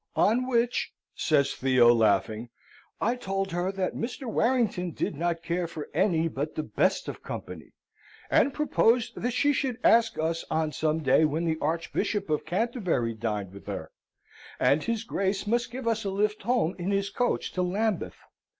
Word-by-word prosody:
On 245 Hz, +5 st, +3 dB
which," 240 Hz, -1 st, +1 dB, 0.2 s
says 140 Hz, -3 st, +2 dB
Theo, 125 Hz, -2 st, +5 dB
laughing, 110 Hz, +1 st, +1 dB, 0.5 s
"I 235 Hz, -, +1 dB
told 195 Hz, -4 st, -3 dB
her 175 Hz, +2 st, -1 dB
that 190 Hz, -1 st, -1 dB
Mr. 245 Hz, +4 st, -5 dB
Warrington 225 Hz, -7 st, +1 dB
did -, -, -2 dB
not 170 Hz, +2 st, -1 dB
care 170 Hz, +1 st, -1 dB
for 160 Hz, -2 st, -7 dB
any 170 Hz, -5 st, +2 dB
but 150 Hz, 0 st, -4 dB
the 155 Hz, -, -2 dB
best -, -, 0 dB
of -, -, -6 dB
company, -, -, -8 dB, 0.5 s
and 280 Hz, -, +3 dB
proposed 245 Hz, -5 st, +2 dB
that 245 Hz, -, -1 dB
she 285 Hz, +4 st, +2 dB
should 260 Hz, -4 st, -1 dB
ask 230 Hz, -1 st, +4 dB
us 165 Hz, +1 st, -1 dB
on 160 Hz, -1 st, 0 dB
some 155 Hz, +1 st, -1 dB
day 135 Hz, +3 st, +4 dB
when 155 Hz, +2 st, +1 dB
the 160 Hz, -1 st, 0 dB
Archbishop 170 Hz, +4 st, -1 dB
of 150 Hz, 0 st, -1 dB
Canterbury 180 Hz, -, 0 dB
dined 105 Hz, -4 st, -3 dB
with 100 Hz, -, -12 dB
her, -, -, -5 dB, 0.7 s
and 145 Hz, +2 st, +3 dB
his 230 Hz, +3 st, -2 dB
Grace 195 Hz, -2 st, -1 dB
must 235 Hz, +3 st, 0 dB
give 250 Hz, -1 st, -6 dB
us 225 Hz, -1 st, +1 dB
a 200 Hz, -, -2 dB
lift 210 Hz, +2 st, 0 dB
home 220 Hz, -6 st, +1 dB
in 175 Hz, +2 st, -2 dB
his 200 Hz, 0 st, 0 dB
coach 245 Hz, -, -1 dB
to 185 Hz, -, -2 dB
Lambeth. 195 Hz, +2 st, -1 dB
185 Hz, 170 wpm, -27 LUFS, 155-230 Hz, 0.7 s, Theo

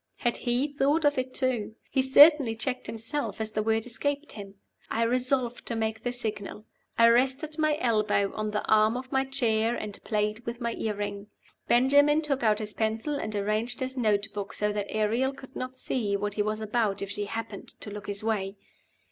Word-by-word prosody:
Had 240 Hz, -2 st, 0 dB
he 245 Hz, +2 st, +1 dB
thought 290 Hz, +2 st, +1 dB
of 290 Hz, -2 st, +3 dB
it 255 Hz, 0 st, -3 dB
too? 250 Hz, -5 st, 0 dB, 0.2 s
He 265 Hz, -, +3 dB
certainly 270 Hz, -2 st, +7 dB
checked 250 Hz, +3 st, -3 dB
himself 230 Hz, 0 st, -4 dB
as 220 Hz, 0 st, -3 dB
the 215 Hz, -, -1 dB
word 220 Hz, +1 st, 0 dB
escaped 285 Hz, +4 st, -2 dB
him. 200 Hz, -2 st, -9 dB, 0.3 s
I 230 Hz, -, 0 dB
resolved 250 Hz, 0 st, 0 dB
to 235 Hz, -, -2 dB
make 220 Hz, 0 st, -2 dB
the 245 Hz, -, -2 dB
signal. 215 Hz, -3 st, -4 dB, 0.3 s
I 230 Hz, -, +7 dB
rested 265 Hz, +6 st, +1 dB
my 305 Hz, -1 st, +2 dB
elbow 215 Hz, -4 st, +1 dB
on 215 Hz, 0 st, -2 dB
the 210 Hz, 0 st, -2 dB
arm 215 Hz, +2 st, +4 dB
of 255 Hz, 0 st, -8 dB
my 265 Hz, -1 st, +2 dB
chair, 235 Hz, -4 st, +1 dB
and 210 Hz, -3 st, -7 dB
played 210 Hz, +1 st, -1 dB
with 235 Hz, +1 st, -5 dB
my 235 Hz, -1 st, -2 dB
earring. 205 Hz, -2 st, -4 dB, 0.4 s
Benjamin 285 Hz, +5 st, +4 dB
took 275 Hz, -3 st, -1 dB
out 215 Hz, -2 st, +3 dB
his 210 Hz, -1 st, -4 dB
pencil 220 Hz, +6 st, -1 dB
and 215 Hz, -7 st, -3 dB
arranged 215 Hz, +4 st, -1 dB
his 260 Hz, 0 st, -3 dB
note 215 Hz, -5 st, +2 dB
book 205 Hz, -1 st, -5 dB
so 210 Hz, 0 st, 0 dB
that 205 Hz, -1 st, -2 dB
Ariel 230 Hz, +5 st, 0 dB
could 265 Hz, -1 st, -13 dB
not 255 Hz, 0 st, -5 dB
see 210 Hz, -7 st, -1 dB
what 205 Hz, 0 st, -3 dB
he 210 Hz, -, -1 dB
was 215 Hz, +1 st, -1 dB
about 215 Hz, -2 st, 0 dB
if 200 Hz, -, -5 dB
she 205 Hz, 0 st, -3 dB
happened 215 Hz, -1 st, -6 dB
to 210 Hz, -, -7 dB
look 205 Hz, 0 st, -8 dB
his 205 Hz, 0 st, -3 dB
way. 205 Hz, -3 st, -1 dB
225 Hz, 200 wpm, -28 LUFS, 210-260 Hz, 0.4 s, certainly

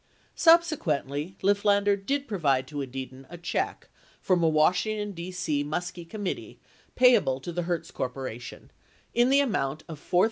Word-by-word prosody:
Subsequently, 185 Hz, -, +2 dB
Lifflander 200 Hz, 0 st, +3 dB
did 275 Hz, +8 st, -2 dB
provide 140 Hz, -, +1 dB
to 145 Hz, -1 st, -5 dB
Edidin 130 Hz, 0 st, -7 dB
a 175 Hz, -, -9 dB
check 175 Hz, 0 st, -3 dB, 0.3 s
from 185 Hz, -2 st, +1 dB
a 165 Hz, -, +4 dB
Washington, 205 Hz, +7 st, +1 dB
D.C. 170 Hz, -5 st, -2 dB
Muskie 170 Hz, +3 st, -4 dB
committee 205 Hz, -4 st, -5 dB, 0.4 s
payable 245 Hz, -, +4 dB
to 175 Hz, -, -6 dB
the 175 Hz, +1 st, -2 dB
Hertz 170 Hz, -1 st, -3 dB
Corp. 125 Hz, +1 st, -4 dB, 1.0 s
in 240 Hz, +2 st, +4 dB
the 275 Hz, +1 st, +5 dB
amount 155 Hz, -, -1 dB
of 160 Hz, -3 st, -8 dB
$4,103.29. 175 Hz, -, 0 dB
175 Hz, 140 wpm, -27 LUFS, 145-205 Hz, 1.0 s, the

